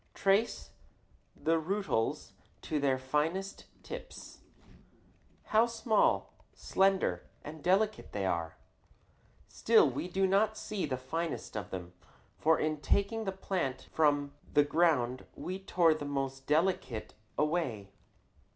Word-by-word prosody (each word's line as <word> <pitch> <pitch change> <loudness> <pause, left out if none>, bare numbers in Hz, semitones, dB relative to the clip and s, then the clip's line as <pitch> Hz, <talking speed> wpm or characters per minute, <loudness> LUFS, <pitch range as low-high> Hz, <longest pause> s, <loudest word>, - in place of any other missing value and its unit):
Trace 200 +4 +1 0.6
the 165 0 +1
rootlets 185 - -1 0.3
to 155 - -1
their 135 -2 +2
finest 155 +9 -2 0.2
tips. - - -9 1.0
How 220 +2 +3
small, 230 -1 +1 0.2
slender, 190 - +1
and 155 +1 -8
delicate 205 +4 +1
they 100 -2 -2
are! 85 -3 -2 0.9
Still 225 -8 +4
we 140 +6 -3
do 190 +2 +1
not 205 +3 +2
see 205 -6 -3
the 130 -2 -2
finest 165 +4 -4
of 105 -2 -4
them, 90 -2 -7 0.5
for 160 +1 +4
in 155 0 0
taking 220 +6 +1
the 195 - -1
plant 185 -8 -3
from 145 -2 +2 0.2
the 145 - +5
ground 145 -5 +1
we 185 +1 -5
tore 175 -4 +3
the 155 - -6
most 135 -1 -3
delicate 155 - 0 0.2
away. 140 - -1
160 Hz, 120 wpm, -32 LUFS, 135-195 Hz, 1.0 s, the